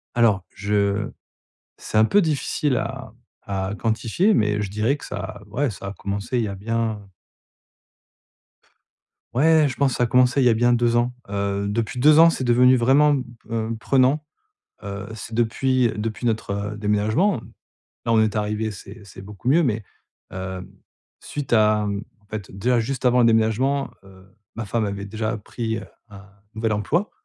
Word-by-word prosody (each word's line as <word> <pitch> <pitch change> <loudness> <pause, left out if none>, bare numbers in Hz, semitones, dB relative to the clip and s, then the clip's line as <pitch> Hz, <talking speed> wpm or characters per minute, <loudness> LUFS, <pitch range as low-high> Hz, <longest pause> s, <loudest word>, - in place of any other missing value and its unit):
Alors 110 -6 +3
je 100 +1 0 0.7
c'est 110 - -3
un 110 - +6
peu 205 - +4
difficile 150 -3 0
à - - -5 0.3
à 95 0 -3
quantifier 115 - +1
mais 105 - +1
je 100 - -3
dirais 110 +7 0
que - - -11
ça 105 -1 -6
ouais 135 +6 -1
ça 100 -1 -8
a 100 - -5
commencé 100 +6 -3
il 115 - +1
y - - -3
a 100 - -5
bien 110 0 -2 2.3
ouais 155 +2 +5
je 120 - -6
pense 140 -3 +1
ça 125 - 0
a - - -2
commencé 125 +2 +3
il - - +3
y - - +6
a - - +5
bien 120 +1 +3
2 120 0 +2
ans. 120 +1 +1 0.2
Heu, 100 0 -2
depuis 115 +3 -2
2 150 +3 +6
ans 165 +1 +8
c'est 130 - -3
devenu 125 +1 +5
vraiment, 140 +5 +4
mmh, 130 -2 0 0.3
heu, 115 0 -2
prenant, 135 +4 +2 0.6
heu, 100 0 -6
c'est 110 +1 -8
depuis 120 +1 +1
depuis 110 +3 -4
notre 105 -2 -2
déménagement. 110 - +1 0.6
Là 115 - +2
on 110 - +5
est 110 0 0
arrivés, 105 +1 -1
c'est 100 +2 -11
c'est 95 - -12
beaucoup 105 +5 -7
mieux 165 +5 +5
mais 110 -6 -1 0.5
hem, 95 0 -6 0.5
suite 145 -4 -6
à 105 -1 +4
mmh 100 +1 -3 0.2
en 105 - -29
fait, 105 -2 -7
déjà 120 +4 +2
juste 130 +2 -4
avant 125 0 +4
le 120 - +5
déménagement, 115 +5 +2
heu, 95 -1 -17 0.3
ma 115 - -3
femme 110 0 0
avait 100 0 -4
déjà 110 +2 -3
pris 110 +1 -4 0.3
un 100 -1 -13 0.3
nouvel 110 0 -1
emploi. 150 - 0
110 Hz, 175 wpm, -23 LUFS, 105-125 Hz, 2.3 s, ans